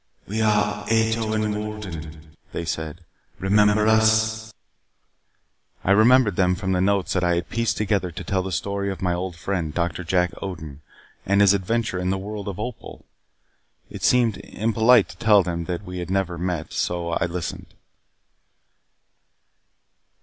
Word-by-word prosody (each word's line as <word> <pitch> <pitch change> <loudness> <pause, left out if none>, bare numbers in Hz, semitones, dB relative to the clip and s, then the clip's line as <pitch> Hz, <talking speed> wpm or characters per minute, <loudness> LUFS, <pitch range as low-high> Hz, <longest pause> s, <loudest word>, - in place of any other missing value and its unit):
"We 110 +3 -2
are 105 -1 +1
Ato 110 0 +1
and 110 -1 0
Wolden," 85 -8 -7 0.2
they 85 - -3
said. 80 +1 -5 0.3
"Remember 105 +2 +3
us?" 110 0 +3 1.3
I 95 - +2
remembered 110 0 +5
them 90 -1 +3
from 95 +1 -3
the 90 -1 +1
notes 100 -1 +1
that 90 - 0
I 90 0 +2
had 85 0 -3
pieced 115 -3 0
together 100 -4 0
to 85 - -7
tell 95 -1 0
the 95 +1 -5
story 100 +3 -2
of 95 -2 -5
my 90 -1 +1
old 90 0 -4
friend, 85 -2 -3
Doctor 85 +2 -2
Jack 90 +1 +1
Odin, 80 -7 -7 0.4
and 100 +1 +2
his 100 -1 +6
adventure 100 0 -1
in 90 0 -1
the 95 - 0
World 105 +1 -6
of 100 -1 -5
Opal. 120 +1 -7 0.9
It - - -8
seemed 120 -4 +3
impolite 115 +1 +3
to - - -12
tell 105 -4 +5
them 85 -1 -3
that 90 +2 -4
we 90 -1 -6
had 90 0 -5
never 95 -2 0
met. 90 -3 -3
So 85 -1 -1
I 85 - 0
listened. 85 -1 -6
95 Hz, 155 wpm, -23 LUFS, 90-110 Hz, 1.3 s, his